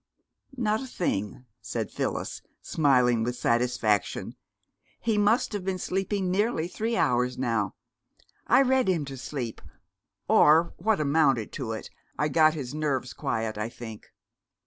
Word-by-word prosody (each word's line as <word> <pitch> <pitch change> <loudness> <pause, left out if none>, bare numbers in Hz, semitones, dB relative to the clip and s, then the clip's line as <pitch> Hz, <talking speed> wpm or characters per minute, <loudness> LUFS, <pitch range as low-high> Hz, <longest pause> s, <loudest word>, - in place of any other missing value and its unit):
"Not 220 -2 +1
a 265 - -6
thing," 125 - -3 0.2
said - - -4
Phyllis, - - -3 0.2
smiling 125 -6 +3
with 120 +1 -2
satisfaction. 120 -4 0 0.7
"He 225 -2 0
must 210 +3 +2
have 205 -3 -3
been 190 0 -1
sleeping 190 +1 -1
nearly 195 -4 +1
three 225 +5 -2
hours 125 +1 +1
now! 115 -6 -1 0.7
I 255 +3 +6
read 260 -2 +2
him 170 -6 +1
to 135 0 -7
sleep, 130 -3 -5 0.7
or 160 +3 +5
what 215 +2 +1
amounted 140 -6 +2
to 120 -5 -4
it. 110 - -7 0.3
I 150 - +1
got 155 +1 +4
his 135 -4 -5
nerves 145 -5 -1
quiet, 110 -1 -2
I 105 +2 -2
think. 110 -3 -10
145 Hz, 140 wpm, -27 LUFS, 120-190 Hz, 0.7 s, I